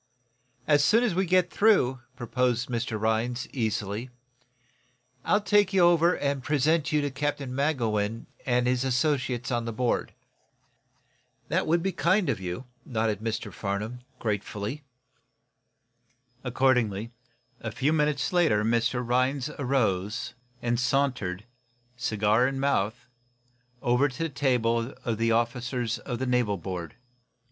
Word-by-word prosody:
"As 145 -1 +4
soon 225 +10 +4
as 230 -7 +1
we 190 +1 0
get 180 0 +3
through," 190 - +3 0.2
proposed 120 0 0
Mr. 115 -2 -2
Rhinds, 115 +4 0
easily, 110 -1 -2 1.1
"I'll 210 - +2
take 205 -1 +3
you 190 - +4
over 175 0 +4
and 140 -1 -1
present 150 +2 +1
you 150 -1 +2
to 145 -1 -2
Captain 140 -1 -2
Magowan 115 -6 0 0.2
and 125 -1 +1
his 125 0 +1
associates 130 -2 0
on 120 -1 0
the 115 - -3
board." 120 +1 -1 1.3
"That - - +1
is 170 +4 +1
kind 185 0 +2
of 105 - -3
you," 95 +7 -5 0.2
nodded 110 -4 -1
Mr. 110 -2 -4
Farnum, 105 +6 -3 0.2
gratefully. 105 +4 -3 1.6
Accordingly, 120 -4 +1 0.5
a 110 - -4
few 145 +7 +1
minutes 150 0 +1
later, 160 -13 +3
Mr. 115 +2 +1
Rhinds 130 +3 +1
arose, 120 -4 0 0.4
sauntering, 125 -7 0 0.5
cigar 110 0 +2
in 135 0 -3
mouth, 120 -5 0 0.8
over 125 +4 +3
to 140 +6 -5
the 165 - -1
table 125 -4 0
of 115 -2 -1
the 115 0 +2
officers 120 +1 -1
of 120 -3 -4
the 130 - -2
naval 125 -5 +1
board. 90 -2 -6
125 Hz, 125 wpm, -27 LUFS, 115-140 Hz, 1.6 s, As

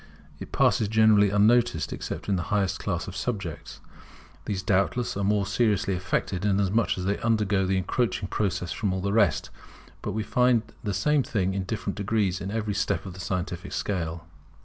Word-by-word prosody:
It - - -8
passes 110 - +3
generally 110 -1 +5
unnoticed 105 -2 +3
except - - -6
in 100 - +2
the 90 - -1
highest 100 -3 +1
class 85 -4 -2
of 95 - -7
subjects. 100 -6 -4 0.6
These 95 -3 -3
doubtless 100 +6 +1
are 100 - -2
more 100 0 +2
seriously 105 -1 +1
affected, 90 0 -2
inasmuch 100 +2 +1
as 90 - -3
they 100 +1 0
undergo 105 -4 +1
the 95 0 +1
encroaching 105 +2 -1
process 95 -4 -1
from 100 -4 -1
all 95 - -2
the 100 +1 -1
rest; 100 -10 +2 0.5
but - - -3
we 110 - -1
find 125 0 +3 0.2
the 100 -3 -2
same 145 +9 +2
thing 95 -7 -1
in 95 -1 -2
different 100 -1 -3
degrees, 100 -2 0
in 95 - -4
every 110 -1 -2
step 100 -2 -1
of 95 - -7
the 95 - -11
scientific 90 +1 -4
scale. 85 -4 -3
100 Hz, 180 wpm, -26 LUFS, 95-110 Hz, 0.6 s, generally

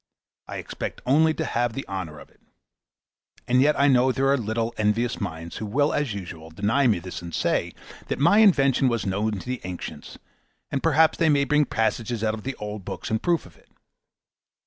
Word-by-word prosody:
I - - -6
expect - - -6
only 155 +5 +4
to 160 - -2
have 120 -3 0
the 135 - -6
honour 95 -6 -5
of - - -14
it. - - -30 1.1
And 125 +1 +4
yet 150 +2 +3
I 140 - +5
know 130 -1 +4
there 135 +2 +1
are 140 - +5
little, 115 -1 -2
envious 110 +3 0
minds, 85 -3 -5
who 110 - -4
will, 145 +8 +1
as 140 -8 -1
usual, 85 -4 -8
deny 105 - +1
me 110 -5 +3
this 90 +1 -7
and 85 -2 -6
say, - - 0 0.3
that - - -2
my 170 +9 +5
invention 135 - +4
was 115 -3 0
known 100 +3 -1
to 100 - -6
the 125 -1 -3
ancients, 90 -1 -7 0.5
and 140 - -1
perhaps 160 0 +3
they 165 - +4
may 140 -2 +4
bring 150 +1 +3
passages 115 -1 -1
out 110 -1 +1
of 110 - -6
the 135 +4 -4
old 105 -1 -6
books - - -6
in 110 - +1
proof 170 +4 0
of 90 - -16
it. - - -26
120 Hz, 205 wpm, -25 LUFS, 100-140 Hz, 1.1 s, I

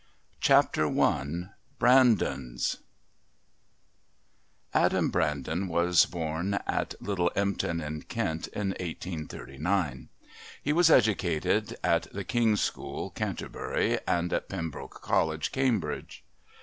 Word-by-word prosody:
Chapter 75 - +4
I 85 +7 0 0.3
Brandons 105 - +3 2.0
Adam - - +2
Brandon 80 +4 -1
was 85 +1 +4
born 85 +3 -2
at - - -2
Little 90 -4 0
Empton 100 -4 0
in 75 0 -5
Kent 80 0 -3
in 105 -2 -3
1839. 80 -3 -3 0.5
He 145 - +1
was 170 +1 +5
educated 100 - +2
at 85 -1 +1
the 100 - -5
King's 115 -3 +2
School, - - -3
Canterbury, - - -2
and 85 0 0
at - - -2
Pembroke 85 -5 -6
College, 80 -1 +1
Cambridge. 130 -8 -1
85 Hz, 95 wpm, -28 LUFS, 80-100 Hz, 2.0 s, was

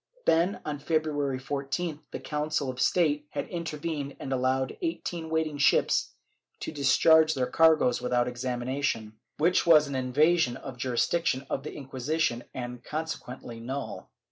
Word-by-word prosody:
Then, 170 +5 +2
on 145 -1 -3
February 145 -3 0
14th 145 +4 -3
the - - -6
Council 150 -2 -2
of 130 - -6
State 150 -4 +2
had - - -4
inter 170 -3 -4
vened 145 -3 -4
and 135 - -3
allowed 130 +1 +1
the - - -10
eighteen 175 - -3
waiting 160 -2 -1
ships 140 - +3 0.5
to - - -4
discharge 160 +2 +5
their 130 -2 +1
cargoes 160 -5 +4
without 120 0 +1
examination, 125 -2 -2 0.2
which 170 +4 +2
was 155 -3 +7
an 140 - -5
invasion 135 +2 +2
of 135 - -8
the 125 - -19
juris 125 -2 +1
diction 160 -6 0
of - - -1
the 145 - -7
Inquisition 135 -1 -1
and 125 -1 -6
consequently 135 -6 -5
null. 130 +4 -5
145 Hz, 155 wpm, -28 LUFS, 130-160 Hz, 0.5 s, was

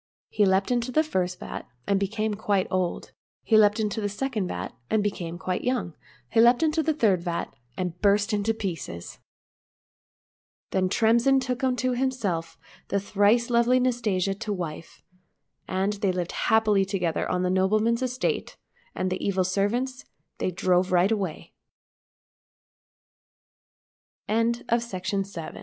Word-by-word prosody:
He 205 -2 +3
leaped 190 +4 +2
into 245 0 0
the 310 +5 +3
first 185 - -2
vat, - - -7 0.2
and 200 -1 +2
became 215 +2 -1
quite 200 -2 0
old; 185 -2 -1 0.3
he 225 - +2
leaped 210 0 +5
into 215 0 -1
the 205 - -1
second 215 -2 -2
vat, 90 - -5 0.2
and 215 -1 +2
became 175 -4 -3
quite 185 0 -3
young; 245 -10 -1 0.3
he 225 - +4
leaped 240 +5 +5
into 320 0 +2
the 315 -1 0
third 205 - +2
vat, 170 -1 -3 0.2
and 180 -1 -4
burst 205 +1 +3
to 210 +1 +1
pieces. 165 - -5 1.5
Then 185 -1 +1
Tremsin 235 +6 +4
took 255 0 -3
unto 255 0 +1
himself 240 -10 -2 0.3
the 200 - 0
thrice 210 +5 +2
lovely 235 +2 +4
Nastasia 220 -7 0
to 210 +2 -5
wife, 170 -4 -6 0.6
and 190 +2 0
they 200 -2 0
lived 180 -1 -3 0.2
happily 215 -3 +4
together 185 -4 -1
on 180 0 0
the 180 - +1
nobleman's 215 +5 +2
estate, 255 0 -2 0.4
and 185 - -1
the 185 - -2
ev 190 -2 +1
205 Hz, 125 wpm, -26 LUFS, 185-235 Hz, 1.5 s, leaped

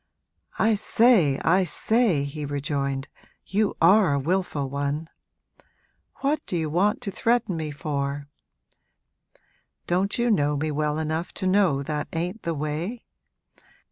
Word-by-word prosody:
'I 220 0 +3
say, 210 - +3
I 185 +3 +4
say,' 195 - +2
he 145 +2 -5
rejoined, 140 -1 -2 0.4
'you 210 +2 0
are 190 -7 +5
a - - +1
wilful 160 -2 -1
one! 140 +3 -3 1.1
What 290 +2 0
do 180 - -1
you 160 -2 -2
want 200 +6 +1
to 200 - -4
threaten 230 -2 +1
me 160 -2 -3
for? 145 -1 -3 1.6
Don't 185 +3 0
you 240 0 +2
know 145 -6 +2
me 155 +2 -1
well 150 0 -1
enough 160 +2 -3
to - - -3
know 185 -8 +3
that 150 +1 -3
ain't 180 +6 -3
the 165 -1 -2
way? 155 +10 -3
160 Hz, 135 wpm, -25 LUFS, 145-200 Hz, 1.6 s, are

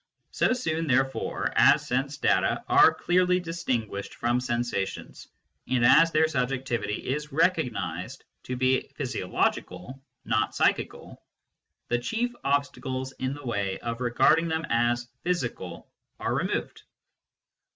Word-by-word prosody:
So - - +1
soon, 165 -10 -2
there 135 0 +4
fore, 135 - -3
as - - +5
sense 135 +3 -1
data - - +1
are - - +7
clearly 180 0 +2
distinguished 130 - -3
from 120 +1 0
sensa 120 -5 -1
tions, - - -10 0.4
and 125 -2 +2
as 165 +7 +7
their 155 0 +3
subjectivity 125 -6 -2
is 150 +3 -3
recognised 160 -2 -1 0.2
to 125 - -3
be 130 +1 +1
physio - - -4
logical 90 +10 -2 0.2
not 110 - 0
psychical, - - -1 0.7
the 120 - +1
chief 230 - -2
obstacles 135 -2 -1
in 130 +1 -2
the 145 -1 -11
way 100 -5 -2
of 115 +1 -5
regarding 150 +7 +3
them 160 0 -1
as 120 +1 +1 0.2
physical 125 - -3 0.3
are - - -1
removed. - - -2
130 Hz, 130 wpm, -27 LUFS, 120-160 Hz, 0.7 s, are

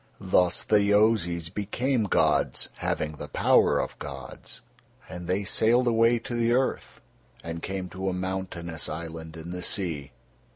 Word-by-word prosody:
Thus 90 -2 +2
the 105 -1 +4
Yozis 100 -5 +2
became 115 +4 0
gods, 100 - +2
having 75 - -1
the 75 - -6
power - - +4
of - - -3
gods, - - -8 0.5
and 90 -1 -7
they 95 +3 0
sailed 115 +5 +3
away 115 0 +4
to 115 +1 -6
the 120 0 +2
earth, 130 +1 -1 0.4
and 85 0 -5
came 95 0 -4
to 95 +2 -3
a - - -1
mountainous 90 -3 -4
island 80 0 -6
in 80 +2 -7
the 90 0 -5
sea. 85 -7 -2
95 Hz, 150 wpm, -27 LUFS, 85-110 Hz, 0.5 s, the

